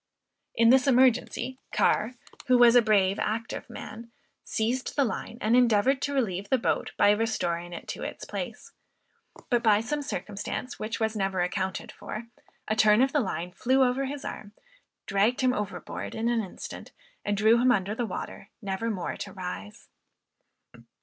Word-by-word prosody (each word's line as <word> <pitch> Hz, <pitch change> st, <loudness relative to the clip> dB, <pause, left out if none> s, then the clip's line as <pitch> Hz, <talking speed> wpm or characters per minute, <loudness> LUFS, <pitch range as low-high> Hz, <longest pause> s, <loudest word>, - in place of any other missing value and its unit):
In 230 Hz, 0 st, +5 dB
this 265 Hz, +1 st, +5 dB
emergency, 255 Hz, 0 st, +2 dB
Carr, 225 Hz, +4 st, +2 dB, 0.3 s
who 255 Hz, -1 st, +5 dB
was 240 Hz, 0 st, +7 dB
a 245 Hz, -, +8 dB
brave, 200 Hz, -3 st, +2 dB
active 225 Hz, +2 st, -3 dB
man, 225 Hz, +2 st, -9 dB, 0.3 s
seized 240 Hz, +4 st, -2 dB
the 280 Hz, -, +3 dB
line, 225 Hz, 0 st, -4 dB
and 220 Hz, +3 st, +3 dB
endeavored 250 Hz, +2 st, +4 dB
to 285 Hz, -, -1 dB
relieve 200 Hz, -6 st, -1 dB
the 265 Hz, -, +4 dB
boat 235 Hz, -, -1 dB
by 205 Hz, -, +6 dB
restoring 190 Hz, -6 st, -1 dB
it 170 Hz, -, -8 dB
to -, -, -5 dB
its -, -, -6 dB
place; -, -, -6 dB, 0.8 s
but, 240 Hz, -1 st, +3 dB
by 215 Hz, -3 st, +4 dB
some 290 Hz, +7 st, -2 dB
circumstance 225 Hz, -1 st, -5 dB
which 220 Hz, +1 st, -3 dB
was 220 Hz, 0 st, 0 dB
never 195 Hz, -3 st, 0 dB
accounted 190 Hz, +1 st, -2 dB
for, 215 Hz, -, -7 dB, 0.4 s
a 215 Hz, -, 0 dB
turn 215 Hz, +1 st, +5 dB
of 270 Hz, -, +1 dB
the 295 Hz, -, +3 dB
line 180 Hz, -6 st, -3 dB
flew 260 Hz, +7 st, +2 dB
over 255 Hz, +2 st, +1 dB
his 280 Hz, +1 st, -5 dB
arm, 205 Hz, -1 st, -7 dB, 0.5 s
dragged 205 Hz, +6 st, +2 dB
him 255 Hz, -1 st, +3 dB
overboard 210 Hz, -5 st, -5 dB
in 225 Hz, +1 st, 0 dB
an 235 Hz, -1 st, +1 dB
instant, 190 Hz, -, -8 dB, 0.3 s
and 205 Hz, 0 st, -1 dB
drew 220 Hz, +3 st, +5 dB
him 255 Hz, 0 st, +5 dB
under 200 Hz, -3 st, +1 dB
the 230 Hz, +1 st, -2 dB
water, 195 Hz, +1 st, -7 dB
never 200 Hz, +1 st, -3 dB
more 190 Hz, -6 st, -3 dB
to 200 Hz, -, -6 dB
rise. 180 Hz, -, -7 dB
220 Hz, 170 wpm, -27 LUFS, 200-250 Hz, 0.8 s, a